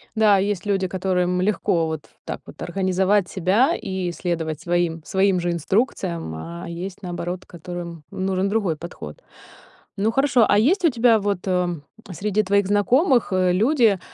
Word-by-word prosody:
Да, 215 -2 +5
есть 200 -1 -1
люди, 195 -2 +1
которым 180 -1 0
легко 185 -4 +1
вот 160 -2 -5 0.2
так - - -5
вот - - -13
организовать 190 +1 +1
себя 205 - +2
и 190 -2 -3
следовать 165 -3 -3
своим 175 -2 -1
своим 190 +1 +2
же 175 0 -1
инструкциям, 170 - -1
а 170 - -7
есть, 180 +3 -6
наоборот, 175 0 -5
которым 170 -1 -8
нужен 190 0 -1
другой 200 -6 0
подход. 175 - -9 0.7
Ну, 205 +3 +1
хорошо, 270 -2 +3
а 205 - +4
есть 340 - +3
у - - +6
тебя 235 -3 +4
вот, 200 -2 -1
э, 180 -1 +1 0.4
среди 210 +4 0
твоих 200 0 +2
знакомых, 235 - +3
э, 185 -1 +3
люди, 220 0 +3
190 Hz, 155 wpm, -22 LUFS, 175-205 Hz, 0.7 s, у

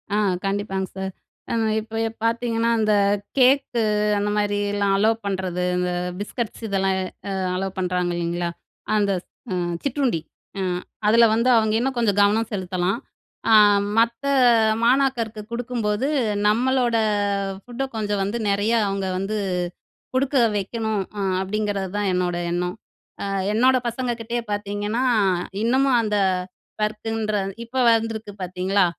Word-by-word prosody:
ஆ - - +2 0.3
கண்டிப்பாங்க 195 -1 -1
சார். 190 0 -3 0.4
ஆ - - 0 0.3
இப்ப 220 +1 -8
ஏ - - -2
பார்த்தீங்கன்னா, 230 0 +1
அந்த 215 -1 +2 0.4
கேக்கு 255 -2 +4 0.3
அந்த 205 +1 0
மாதிரிலாம் 205 -1 +1
அலோவ் 220 +2 +3
பண்றது, 185 -2 -2
இந்த 180 0 0 0.3
பிஸ்கட்ஸ் 225 +2 -4
இதெல்லாம் 195 -1 +1 0.4
அ - - -2 0.2
அலோவ் 190 0 -3
பண்ணுறாங்க 180 -1 0
இல்லைங்களா, 175 0 -1 0.5
அந்த 200 -2 +2 0.5
அ - - 0 0.2
சிற்றுண்டி 265 - 0 0.4
அ - - -1 0.5
அதில 230 +2 +6
வந்து 235 +3 +2
அவங்க 220 -1 +2
இன்னும் 260 +1 -1
கொஞ்சம் 205 -3 +2
கவனம் 210 +2 +3
செலுத்தலாம். 185 +1 -1 0.5
அ - - +7 0.4
மத்த 235 +3 +2 0.6
மாணாக்கருக்கு 240 -4 +2
குடுக்கும்போது 235 -1 -1 0.4
நம்பளோட 245 +1 +2 0.7
ஃபுட்ட 245 +2 -4
கொஞ்சம் 205 -2 -1
வந்து, 205 +4 -2
நிறையா 205 +4 +2
அவங்க 195 0 -2
வந்து 205 +3 -2 0.8
குடுக்க 270 +1 +1 0.2
வைக்கணும் 215 +1 -2 0.2
அ - - -1 0.2
அப்படிங்கறது 200 -1 -2
தான் 205 -1 0
என்னோட 180 -1 0 0.2
எண்ணம். 180 +1 -1 0.5
அ - - -2 0.3
என்னோட 255 +4 +4
பசங்க 245 +1 -2
கிட்டயே 235 +1 -2
பார்த்தீங்கன்னா 205 +3 -2 0.6
இன்னமும் 260 +2 +3
அந்த 210 -1 0 0.6
பர்க்குன்ற, 215 0 -1 0.3
இப்ப 255 +2 0
வந்திருக்கு 225 -2 -1
பார்த்தீங்களா, 185 +2 +1
215 Hz, 125 wpm, -23 LUFS, 195-235 Hz, 0.8 s, அ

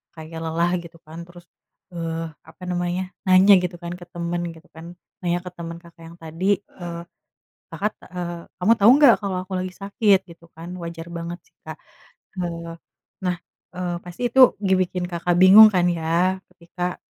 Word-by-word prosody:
kayak 160 0 -9
lelah 170 +2 0
gitu 170 0 -13
kan. 160 +2 -9
Terus, 175 0 -15 0.5
eee, 165 -1 -4 0.2
apa 165 +3 -16
namanya, 175 +1 -1 0.2
nanya 185 +2 +7
gitu 180 0 -3
kan 170 0 -5
ke 175 - -10
teman 170 0 -3
gitu 165 +2 -18
kan, 165 +1 -10 0.4
nanya 175 0 0
ke 180 - -7
teman 170 0 -6
Kakak 170 -1 -16
yang 170 +1 -13
tadi, 180 +5 -1
eee, 170 -4 -9 0.7
Kakak, 210 +1 -2
eee, 175 -1 -6
"Kamu 210 +6 +4
tau 200 - +5
nggak 285 -5 +7
kalo 195 -2 -3
aku 185 +1 -9
lagi 185 0 -5
sakit?" 200 0 +2
gitu 170 0 -15
kan, 165 +2 -9
wajar 170 0 -7
banget 170 +1 -6
sih - - -36
Kak. - - -8 0.6
Eee, 170 -1 -5 0.5
nah, 180 -1 0 0.4
eee, 180 -1 -3
pasti 180 +8 -3
itu, 265 - +3 0.2
ngebikin 185 -2 +1
Kakak 175 0 -1
bingung 200 +4 +10
kan 180 -1 +3
ya? 175 +3 0
Ketika, 180 0 -5
175 Hz, 170 wpm, -22 LUFS, 170-185 Hz, 0.7 s, bingung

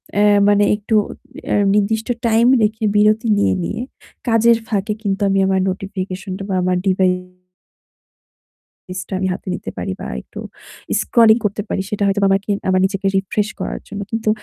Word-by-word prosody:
অ্যা 205 - +4 0.2
মানে 205 0 +4
একটু 215 +2 -2 0.5
অ্যা - - +1 0.2
নির্দিষ্ট 215 +2 +1 0.2
time 230 +1 +4
রেখে 215 +1 0
বিরতি 215 +3 +3
নিয়ে, 205 - +2
নিয়ে 220 +6 -3 0.5
কাজের 230 0 +4
ফাঁকে 210 -1 -1
কিন্তু 200 -1 -2
আমি 195 0 +2
আমার 190 0 +1
notification 190 0 -5 0.2
বা 190 - -1
আমার 180 0 +1
ডিবা 190 0 +2 1.8
device 185 -1 -5
টা - - -14
আমি 190 - 0
হাতে 180 - -7
নিতে - - -6
পারি 90 +1 -3
বা - - -5 0.2
একটু - - -10 0.6
scrolling 230 0 +4
করতে 205 0 -1
পারি। - - -1
সেটা 210 -1 -2
হয়তোবা 200 0 +2
আমাকে 195 +2 0 0.2
আমার 185 0 +3
নিজেকে 195 0 -4
refresh 205 +2 -1
করার - - -4
জন্য। 205 - -6
কিন্তু 225 -1 -2
205 Hz, 160 wpm, -19 LUFS, 195-220 Hz, 1.8 s, অ্যা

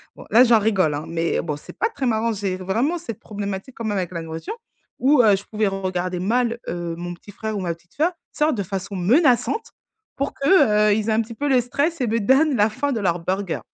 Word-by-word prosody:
bon, - - -12
là, 240 +3 +8
j'en 235 -3 +5
rigole, 190 -8 +2
hein, 150 - -5
mais 165 0 -1
bon 150 -3 -3
c'est - - -12
pas 455 - +1
très 275 -12 -4
marrant, 225 0 +1
j'ai 195 -2 -2
vraiment 230 - 0
cette 230 - -7
problématique 200 +3 -6
quand 230 - -5
même 205 -2 -1
avec 180 -2 -2
la 170 -2 -4
nourriture 165 - -6 0.4
où, 270 0 +5
heu, 210 -2 +6
je 195 - -6
pouvais 215 -1 -1
regarder 185 -2 -2
mal, 235 +4 0
heu, 170 -1 -4
mon 175 +1 -5
petit 205 - -14
frère 220 +1 -4
ou - - -3
ma 170 -2 -1
petite 170 +1 -30
sœur, 325 +5 +2 0.2
sorte 300 -3 +1
de 200 - -2
façon 195 +1 -5
menaçante 255 - +2 0.5
pour 275 +1 -2
que, 215 - +4
heu, 205 - +4
ils 220 +1 -1
aient - - +3
un 220 - +3
petit 230 +1 -7
peu 290 +6 -2
le 255 -2 +4
stress 285 +5 -1
et 245 - +1
me 230 +2 +1
donnent 265 +6 +3
la 210 +1 +4
fin 265 +6 -2
de 225 - -1
leur 175 -2 +1
burger. 190 -1 -2
215 Hz, 245 wpm, -22 LUFS, 185-250 Hz, 0.5 s, là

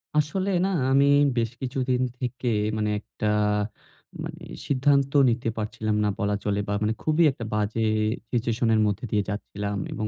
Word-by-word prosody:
আসলে 170 +6 +1 0.2
না - - +1 0.2
আমি 140 +1 +5 0.3
বেশ 115 -1 +1
কিছুদিন 130 -1 -1 0.2
থেকে 125 0 -4 0.3
মানে 105 0 0
একটা 110 - -7 1.0
মানে - - -7 0.3
সিদ্ধান্ত 140 0 +2 0.2
নিতে 120 0 -1
পারছিলাম 110 0 -2
না 105 - +2
বলা 105 -1 +1
চলে। 105 -1 0
বা 100 - -1
মানে 110 +1 +1
খুবই 155 +2 +3
একটা 120 -3 -7
বাজে 105 +2 0 0.5
সিচুয়েশন 120 0 0
এর 110 - +3
মধ্যে 105 +3 -2
দিয়ে 105 -1 +2
যাচ্ছিলাম। 100 0 -4
এবং 110 - -3
115 Hz, 155 wpm, -25 LUFS, 105-130 Hz, 1.0 s, আমি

